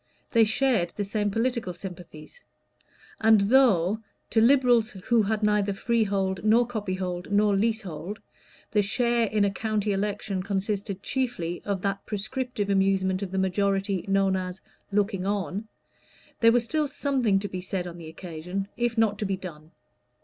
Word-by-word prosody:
They 230 -2 +5
shared 225 -6 +1
the 205 - -1
same 205 +1 -1
political 225 -3 -1
sympathies; 180 - -10 0.8
and 220 -1 +6
though, 205 -4 +4 0.3
to 225 - +4
Liberals 245 -2 +4
who 225 +3 +1
had 215 +1 -1
neither 210 -1 +2
freehold 195 -4 0
nor 225 +3 +4
copyhold 185 -5 -4
nor 205 0 +3
leasehold, 200 -3 -2 0.5
the 210 - +3
share 235 +3 +1
in 210 -1 +2
a 200 - +1
county 215 0 -1
election 200 -1 -2
consisted 195 0 -3
chiefly 230 -10 -2
of 200 -3 -2
that 200 0 -1
prescriptive 215 0 -2
amusement 190 -1 +2
of 200 - -3
the 190 - -4
majority 195 0 0
known 195 -1 +2
as 185 0 -4 0.3
"looking 200 -2 0
on," 205 +1 -2 0.7
there 230 0 +6
was 240 0 +2
still 305 +4 0
something 260 -8 +1
to 200 +1 -2
be 185 -2 -5
said 185 -1 -3
on 175 -1 -8
the 165 - -9
occasion, 180 +4 -5
if 240 0 -1
not 215 -2 +2
to 210 - -1
be 195 -1 -1
done. 160 -5 -9
200 Hz, 155 wpm, -26 LUFS, 190-225 Hz, 0.8 s, and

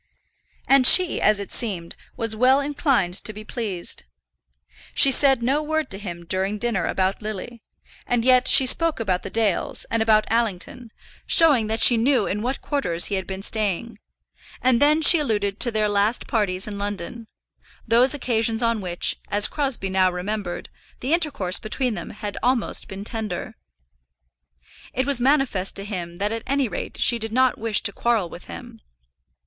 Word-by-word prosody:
And 270 -2 +6
she, 365 -3 +5
as 215 -1 +3
it 200 - -7
seemed, 185 -8 -4 0.2
was 225 -2 -1
well 255 +4 +4
inclined 275 - 0
to - - -3
be 215 0 -10
pleased. 210 - -5 0.9
She 275 - +6
said 265 -2 +3
no 275 +5 +1
word 315 -1 -2
to 195 - -5
him 175 -4 -7
during 190 +4 -1
dinner 215 -4 -1
about 190 +2 -1
Lily; 215 +2 -7 0.5
and 245 -1 0
yet 255 0 +4
she 265 - +7
spoke 325 +4 +1
about 185 -5 -1
the - - -7
Dales, 215 -3 -1
and 230 - 0
about 215 -1 +3
Allington, 230 +1 -2 0.4
showing 285 -10 +4
that 220 +1 -2
she 240 - +6
knew 240 -1 +2
in 205 +2 -3
what 255 +4 -3
quarters 180 - 0
he - - 0
had 190 -2 -2
been 190 0 -6
staying, 215 +1 -3 0.6
and 255 -1 +2
then 305 +2 +3
she 335 +2 +7
alluded 205 -7 -2
to 240 - +3
their 215 -2 0
last 205 +3 0
parties 195 -4 0
in 205 -1 -7
London, 205 +3 -5 0.6
those 250 +5 +4
occasions 230 -3 0
on 230 -2 0
which, 175 -2 -2
as 205 0 +4
Crosbie 265 -10 -3
now 185 -1 +2
remembered, 180 0 -5 0.3
the 265 +5 -1
intercourse 290 - 0
between 235 +2 -2
them - - -6
had 210 -1 -7
almost 250 -3 0
been 195 +1 -8
tender. 215 -5 -5 1.4
It 260 - 0
was 280 -3 +1
manifest 260 -8 +1
to 195 - -2
him 175 -5 -5
that 205 +2 -1
at 225 0 -3
any 275 -1 +1
rate 195 - -6
she 235 - +3
did 225 0 -4
not 255 +1 +2
wish 220 -2 0
to 200 - 0
quarrel 225 -7 0
with - - -11
him. - - -10
225 Hz, 175 wpm, -22 LUFS, 200-255 Hz, 1.4 s, she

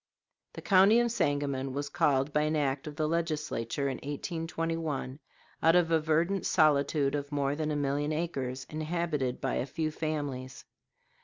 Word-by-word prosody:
The - - -9
county 200 +3 +6
of 240 -1 +1
Sangamon 140 - -1
was 145 +1 -3
called 140 0 +1
by 150 - +3
an 155 +1 +1
act 140 -1 -1
of 150 - -6
the 155 0 0
Legislature 150 -6 -1
in 130 -2 -2
1821 160 -2 -3 0.4
out 165 +1 +5
of 170 -2 +3
a 165 - +4
verdant 165 +5 +1
solitude 145 -2 +3
of 145 0 -3
more 140 -1 0
than 155 0 -2
a 150 - -1
million 145 +1 0
acres, 135 -5 -3
inhabited 155 -4 -2
by 135 - -1
a 130 - -2
few 155 +3 -2
families. 145 -5 -4
150 Hz, 160 wpm, -30 LUFS, 140-165 Hz, 0.4 s, county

